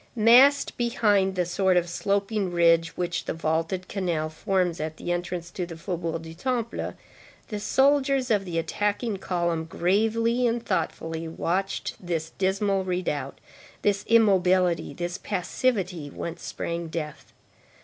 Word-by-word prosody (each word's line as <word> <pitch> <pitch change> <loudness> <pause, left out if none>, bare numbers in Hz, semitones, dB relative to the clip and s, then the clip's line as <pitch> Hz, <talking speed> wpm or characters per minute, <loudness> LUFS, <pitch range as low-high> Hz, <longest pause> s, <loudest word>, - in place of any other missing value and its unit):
Massed 245 +6 +6
behind 205 -5 +2
the 180 -1 +1
sort 185 +1 +2
of 175 0 +2
sloping 200 +2 -1
ridge 170 -1 +3
which 175 -1 -2
the - - -3
vaulted 165 +3 -1
canal 170 -6 -1
forms 180 0 0
at 155 +1 -4
the 175 - -4
entrance 175 -1 -3
to 180 - -4
the 170 -2 -7
Faubourg 165 -2 -3
du 160 0 -9
Temple, 235 +4 -2 0.5
the 210 -3 -3
soldiers 270 +3 +2
of 205 -2 +3
the 175 -3 -4
attacking 205 +5 -1
column, 170 -3 -1
gravely 225 +8 +1
and 235 0 -1
thoughtfully, 165 -3 -2
watched 185 +4 -2
this 165 -2 -3
dismal 195 0 +1
redoubt, 180 -7 -2 0.5
this 205 -1 +2
immobility, 185 -7 +3
this 175 +2 -4
passivity, 185 - -1
whence 170 +4 -6
sprang 170 0 -4
death. 155 -2 -6
185 Hz, 135 wpm, -26 LUFS, 170-210 Hz, 0.5 s, Massed